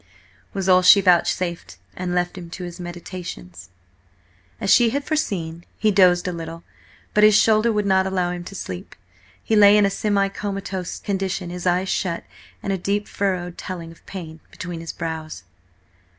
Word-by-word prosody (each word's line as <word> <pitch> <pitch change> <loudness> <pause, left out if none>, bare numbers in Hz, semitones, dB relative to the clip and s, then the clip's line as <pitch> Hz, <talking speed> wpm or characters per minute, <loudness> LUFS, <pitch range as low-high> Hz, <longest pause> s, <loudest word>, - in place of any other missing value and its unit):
was 195 -1 -3
all 185 -1 +6
she 180 +2 +8
vouchsafed, 175 - +1 0.2
and 180 -1 -3
left 175 +1 0
him 175 -2 -8
to 180 +2 -7
his 175 0 -7
meditations. 175 - -8 0.9
As - - 0
she 240 -2 +6
had 280 +5 -2
foreseen, 175 - -2
he 215 - +2
dozed 180 -2 +4
a 180 - -2
little, 165 0 -7 0.5
but 210 - +4
his 215 -1 +7
shoulder 220 +1 +4
would 210 -1 0
not 190 -1 +3
allow 180 -2 0
him 175 -1 -5
to 195 - -9
sleep. 90 - -7 0.5
He 220 - +1
lay 205 0 +7
in 205 - +5
a 195 - +1
semi 200 0 +1
comatose 195 -2 -4
condition, 190 -2 -2
his 180 0 -4
eyes 180 +2 +2
shut, 170 -4 -1 0.4
and 195 - -1
a 190 - -2
deep 205 +3 -1
furrow, 185 -3 -1
telling 170 -1 -7
of 165 - -18
pain, 165 -4 -8
between 175 -2 -7
his 165 0 -6
brows. 160 - -5
185 Hz, 175 wpm, -22 LUFS, 175-200 Hz, 0.9 s, she